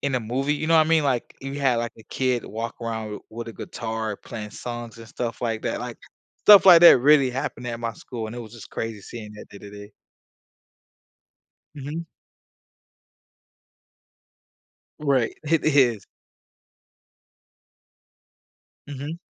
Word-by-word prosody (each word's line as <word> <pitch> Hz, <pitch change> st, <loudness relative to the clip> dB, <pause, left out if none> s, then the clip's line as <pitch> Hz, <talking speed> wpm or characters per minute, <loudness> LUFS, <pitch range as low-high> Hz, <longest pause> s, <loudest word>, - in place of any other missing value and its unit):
in 140 Hz, -1 st, -1 dB
a 125 Hz, -, +1 dB
movie. 130 Hz, +6 st, -1 dB
You 155 Hz, -, -3 dB
know 165 Hz, 0 st, +4 dB
what 155 Hz, -1 st, +5 dB
I -, -, -3 dB
mean? 160 Hz, -2 st, +3 dB
Like, 130 Hz, -4 st, -1 dB
you 135 Hz, +1 st, -5 dB
had, 130 Hz, -3 st, +2 dB
like, 120 Hz, 0 st, -2 dB
a -, -, -13 dB
kid 125 Hz, 0 st, -1 dB
walk 115 Hz, +2 st, -5 dB
around 110 Hz, -2 st, -5 dB
with 115 Hz, +1 st, -7 dB
a -, -, -7 dB
guitar 110 Hz, -2 st, -5 dB
playing 105 Hz, -1 st, -8 dB
songs 120 Hz, 0 st, -7 dB
and 115 Hz, 0 st, -11 dB
stuff 115 Hz, +1 st, -5 dB
like 115 Hz, -2 st, -1 dB
that. -, -, -2 dB
Like, -, -, -7 dB, 0.4 s
stuff 205 Hz, -2 st, +8 dB
like 180 Hz, -3 st, +9 dB
that 170 Hz, -6 st, +9 dB
really 140 Hz, 0 st, +5 dB
happened 125 Hz, -1 st, -4 dB
at 120 Hz, -1 st, -4 dB
my 115 Hz, -1 st, -3 dB
school, 115 Hz, +1 st, -7 dB
and 110 Hz, -, -8 dB
it -, -, -6 dB
was 110 Hz, -2 st, -10 dB
just 115 Hz, -, -12 dB
crazy 110 Hz, -3 st, -5 dB
seeing 105 Hz, 0 st, -9 dB
that 105 Hz, -, -12 dB
day 100 Hz, -, -11 dB
to 100 Hz, -, -11 dB
day. 105 Hz, 0 st, -11 dB, 1.8 s
Mhm. 150 Hz, +4 st, -6 dB, 2.9 s
Right. 135 Hz, -6 st, +1 dB
It 160 Hz, +1 st, +1 dB
is. 125 Hz, -, +3 dB, 2.8 s
Mhm. 145 Hz, +3 st, -6 dB
120 Hz, 150 wpm, -24 LUFS, 115-140 Hz, 2.9 s, like